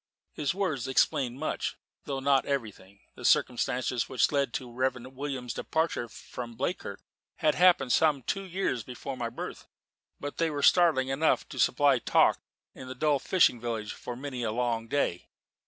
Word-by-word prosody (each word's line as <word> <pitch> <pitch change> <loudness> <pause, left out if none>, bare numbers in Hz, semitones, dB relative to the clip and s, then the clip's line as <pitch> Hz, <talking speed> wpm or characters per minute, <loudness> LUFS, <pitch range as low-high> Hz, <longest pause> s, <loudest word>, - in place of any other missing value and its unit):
His 150 +3 -1
words 155 -11 -1
explained 130 -1 +1
much, 155 - -2 0.3
though 135 -1 -3
not 135 0 +3
everything. 105 -7 -4
The - - -12
circumstances 125 0 +1
which 130 - +2
led 140 -4 +1
to - - -2
the 120 - -11
Reverend 130 +1 -2
William's 130 -3 -4
departure 160 -7 -1
from 120 +2 -8
Bleakirk 130 - -3 0.3
had 155 - +2
happened 175 -8 +4
some 150 -5 +3
two 195 - -2
years 185 -9 -2
before 125 +4 -7
my 120 -2 -3
birth: 115 - -7 0.5
but 145 0 -6
they 165 -1 +1
were 145 -2 -3
startling 160 -7 +5
enough 140 +4 +1
to - - -7
supply 140 -3 +4
talk - - +3 0.3
in 130 - -10
that 130 0 -7
dull 150 0 +2
fishing 130 -8 +3
village 115 -3 -3
for 125 - -7
many 130 -1 -5
a 115 -2 -1
long 115 -1 -1
day. 115 -9 -1
130 Hz, 170 wpm, -29 LUFS, 120-145 Hz, 0.5 s, startling